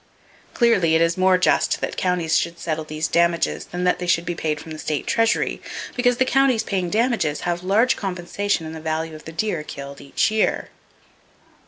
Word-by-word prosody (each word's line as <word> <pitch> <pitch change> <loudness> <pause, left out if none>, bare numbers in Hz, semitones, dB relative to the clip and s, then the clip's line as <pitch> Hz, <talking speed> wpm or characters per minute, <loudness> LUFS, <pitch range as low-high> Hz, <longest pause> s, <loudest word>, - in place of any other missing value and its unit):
Clearly, 195 -10 +3
it 165 - +3
is 165 0 +1
more 185 0 +4
just 180 - +2
that - - -3
counties 180 -3 0
should 170 0 0
settle 160 -2 -3
these 155 +1 -2
damages 170 0 +1
than 180 +1 -5
that 180 - +2
they 180 - -4
should 175 -1 +2
be 175 - -2
paid 155 -2 -2
from 160 +2 -10
the 155 - -7
state 150 -2 -2
treasury, 225 0 +1 0.3
because 245 -1 +2
the 260 - +3
counties 260 -3 +3
paying 185 -5 -2
damages 220 - 0
have 175 0 -2
large 215 +8 +3
compensation 190 -1 -2
in 160 - -6
the 160 - -8
value 160 0 -2
of 155 - -11
the 160 - -7
deer 170 0 -2
killed 140 -2 -8
each 140 +9 0
year. 220 0 0
175 Hz, 195 wpm, -22 LUFS, 160-205 Hz, 0.3 s, more